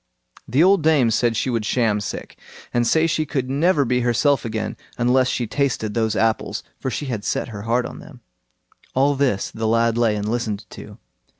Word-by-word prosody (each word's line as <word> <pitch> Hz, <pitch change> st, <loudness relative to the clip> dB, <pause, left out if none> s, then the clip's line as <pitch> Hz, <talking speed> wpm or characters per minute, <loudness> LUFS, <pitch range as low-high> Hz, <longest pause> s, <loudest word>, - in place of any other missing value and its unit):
The 135 Hz, +7 st, +3 dB
old 195 Hz, 0 st, +5 dB
dame 145 Hz, -7 st, +3 dB
said 115 Hz, 0 st, +1 dB
she 130 Hz, -, 0 dB
would 115 Hz, -2 st, -1 dB
sham 110 Hz, -2 st, +1 dB
sick, 100 Hz, -, -6 dB, 0.4 s
and 120 Hz, -1 st, +2 dB
say 160 Hz, +5 st, +3 dB
she 155 Hz, -1 st, +1 dB
could 135 Hz, -3 st, -3 dB
never 145 Hz, +1 st, +2 dB
be 125 Hz, +1 st, +1 dB
herself 125 Hz, +4 st, +2 dB
again 110 Hz, -2 st, -3 dB, 0.2 s
unless 125 Hz, +2 st, +3 dB
she 125 Hz, -, -1 dB
tasted 115 Hz, -3 st, -1 dB
those 110 Hz, -1 st, 0 dB
apples; 115 Hz, 0 st, 0 dB, 0.2 s
for 130 Hz, -, -2 dB
she 145 Hz, -, -4 dB
had 120 Hz, -6 st, -4 dB
set -, -, -2 dB
her 105 Hz, -3 st, -7 dB
heart 120 Hz, +1 st, +2 dB
on -, -, -8 dB
them. -, -, -14 dB, 0.7 s
All 140 Hz, +2 st, +3 dB
this 130 Hz, -8 st, 0 dB
the 110 Hz, 0 st, -3 dB
lad 115 Hz, +1 st, +2 dB
lay 115 Hz, -3 st, +2 dB
and 105 Hz, 0 st, -3 dB
listened 110 Hz, -2 st, -2 dB
to. -, -, -11 dB
120 Hz, 195 wpm, -21 LUFS, 110-140 Hz, 0.7 s, old